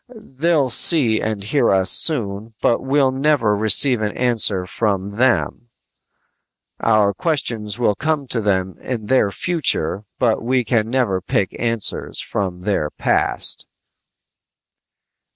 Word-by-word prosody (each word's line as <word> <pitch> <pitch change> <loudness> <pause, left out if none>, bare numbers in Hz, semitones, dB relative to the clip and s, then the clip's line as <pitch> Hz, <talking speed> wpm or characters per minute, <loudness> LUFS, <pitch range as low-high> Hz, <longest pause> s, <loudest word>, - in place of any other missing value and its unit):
They'll 155 - -1
see 120 -5 +3
and 110 -3 -3
hear 115 +4 +1
us 95 -1 +2
soon, 110 -7 -1
but 115 - +1
we'll 135 0 +1
never 135 -6 +1
receive 110 +4 +4
an 105 -1 -3
answer 110 -6 +1
from 100 0 -3
them! 120 -1 0 1.1
Our 110 -3 +2
questions 115 - -2
will 120 -4 +1
come 150 +5 -2
to 115 - -1
them 95 -2 -1
in 120 -4 -5
their 120 -3 +2
future 105 - -1
but 115 -4 +1
we 125 +1 0
can 110 -1 0
never 120 -7 0
pick 95 +1 -2
answers 115 -3 +1
from 90 -3 -4
their 90 -6 -1
past!" - - -1
115 Hz, 125 wpm, -19 LUFS, 100-130 Hz, 1.1 s, receive